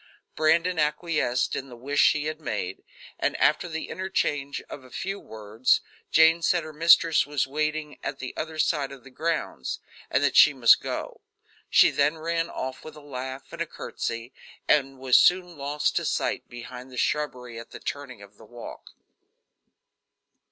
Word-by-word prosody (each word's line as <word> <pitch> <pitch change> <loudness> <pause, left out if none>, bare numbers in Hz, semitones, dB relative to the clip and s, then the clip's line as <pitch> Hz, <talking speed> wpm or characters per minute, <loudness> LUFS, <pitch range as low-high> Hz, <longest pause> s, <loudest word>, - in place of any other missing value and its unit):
Brandon 165 +3 +2
acquiesced 150 -4 0
in 135 - -5
the 120 - -10
wish 140 +4 -3
she 150 0 +4
had 155 0 -3
made, 100 -9 -4 0.4
and, - - 0
after 150 +4 +2
the 160 -1 -5
interchange 150 -6 -2
of 135 - -9
a 130 - -15
few 195 +10 -4
words, 110 +2 0 0.3
Jane 160 +1 +5
said 170 0 +2
her 155 0 -9
mistress 165 0 +5
was 145 -2 0
waiting 150 +2 -3
at 135 - -3
the 130 - -7
other 160 0 -5
side 150 -3 +1
of 135 -2 -11
the 135 - -14
grounds, 140 - -2 0.3
and - - +2
that - - +2
she - - +7
must - - +6
go. - - -5 0.5
She - - +6
then 145 +3 +1
ran 165 +1 -1
off 130 0 -5
with 155 - -10
a - - -11
laugh 130 -2 -7
and - - -6
a - - -1
courtesy, 115 +2 -5 0.3
and 135 -2 +2
was 130 -1 +5
soon 180 -1 +3
lost 145 +1 -1
to - - 0
sight - - -1
behind 125 +2 -9
the 125 - -10
shrubbery 125 -5 -2
at 115 - -11
the - - -10
turning 135 -7 -6
of 100 +1 -17
the 110 - -15
walk. 120 +2 -11
145 Hz, 175 wpm, -26 LUFS, 125-160 Hz, 0.5 s, she